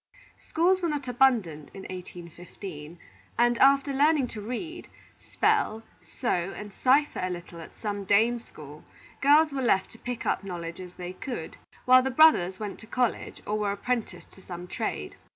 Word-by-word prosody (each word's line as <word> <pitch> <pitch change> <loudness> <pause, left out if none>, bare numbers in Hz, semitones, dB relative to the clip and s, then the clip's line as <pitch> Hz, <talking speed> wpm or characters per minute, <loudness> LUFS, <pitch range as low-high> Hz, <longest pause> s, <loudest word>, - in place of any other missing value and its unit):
Schools 365 +3 +1
were 340 - 0
not 290 -3 -3
abundant 230 - +2
in 195 - -8
1815; 175 -2 -9 0.4
and, 240 0 +3
after 275 +1 +5
learning 290 0 +3
to 215 - -7
read, 250 - -6 0.3
spell, 415 - 0 0.2
sew, 185 -7 -2
and 210 -1 -8
cipher 280 +6 +2
a 185 - -1
little 175 -1 -7
at 160 - -12
some 205 -2 -3
dame 220 +5 +3
school, 150 -9 -13 0.4
girls 295 +2 +5
were 270 - -2
left 190 -6 +2
to 225 - -14
pick 245 -1 -5
up - - 0
knowledge 175 -2 -6
as 180 -1 -10
they 180 0 -6
could; 245 +6 -6 0.3
while 255 0 +7
the 265 - -1
brothers 250 - +5
went 210 -2 -5
to 220 - -13
college, 245 0 -2
or 210 +1 -1
were 205 -1 0
apprenticed 235 +3 -3
to 190 - -17
some 180 -1 -8
trade. - - -4
220 Hz, 170 wpm, -27 LUFS, 180-265 Hz, 0.4 s, while